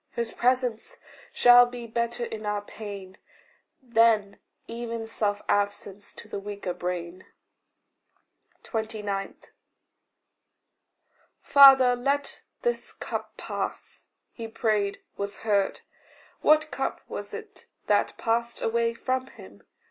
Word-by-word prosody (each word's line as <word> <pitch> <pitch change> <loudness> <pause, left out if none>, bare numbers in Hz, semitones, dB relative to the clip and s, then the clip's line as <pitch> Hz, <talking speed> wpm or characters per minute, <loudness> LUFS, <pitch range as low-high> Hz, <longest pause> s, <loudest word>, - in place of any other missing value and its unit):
His 235 -1 -3
presence 250 -2 0 0.3
shall 245 0 +7
be 245 -1 -7
better 235 +1 -2
in 220 -2 -7
our 210 -1 -2
pain, 200 -3 -9 0.6
Than 225 -4 +3 0.3
even 230 -1 -5
self 210 -2 -2
absence 205 0 -1
to - - -11
the - - -5
weaker 200 -2 -5
brain. 180 0 -5 1.4
29. 210 -3 -3 2.1
"Father, 270 -3 +8
let 275 +3 -1 0.2
this 480 0 -1
cup - - -6
pass." - - -5 0.3
He 230 -2 -6
prayed 215 -3 0 0.2
was 200 0 -5
heard. 200 -3 +1 0.6
What 310 +1 +4
cup - - -3
was - - -6
it 440 -2 -9 0.2
that - - +1
passed 235 0 -1
away 230 0 0
from 255 +2 -2
him? 100 - -14
225 Hz, 105 wpm, -27 LUFS, 205-245 Hz, 2.1 s, Father